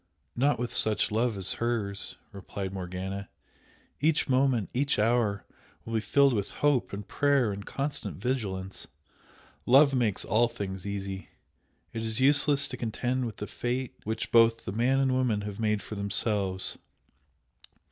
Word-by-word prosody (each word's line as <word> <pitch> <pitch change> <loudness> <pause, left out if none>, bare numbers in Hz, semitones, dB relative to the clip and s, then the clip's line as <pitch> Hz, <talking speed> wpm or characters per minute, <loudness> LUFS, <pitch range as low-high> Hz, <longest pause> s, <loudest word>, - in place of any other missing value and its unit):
"Not 135 +2 +2
with 120 +1 -3
such 105 -1 +2
love 115 0 +1
as 95 -1 +1
hers!" 110 -4 -1 0.2
replied 100 0 -6
Morgana. 95 +1 -5 0.7
"Each 150 +1 +2
moment, 130 -5 +2
each 140 +2 +1
hour 105 -2 +1 0.4
will 115 - -6
be 110 - +2
filled 140 +5 +3
with 100 -3 -1 0.2
hope 145 -4 +2
and 100 0 -6
prayer 140 -6 +2
and 100 0 -6
constant 140 +1 -3
vigilance. 100 -7 -3 0.8
Love 140 +3 +6
makes 115 -6 +1
all 120 +2 +3
things 95 -4 -6
easy! 100 -1 -5 0.6
It 115 - -3
is 110 0 -1
useless 140 +1 +4
to 130 - -5
contend 120 +2 -2
with 110 - -8
a - - -5
fate 125 +1 -3
which 110 +1 -3
both 115 0 +4
the - - -3
man 125 +6 +2
and 135 -1 +2
woman 125 -5 +1
have 100 0 -6
made 105 -2 0
for - - -8
themselves. 100 -1 0
115 Hz, 150 wpm, -28 LUFS, 100-130 Hz, 0.8 s, Love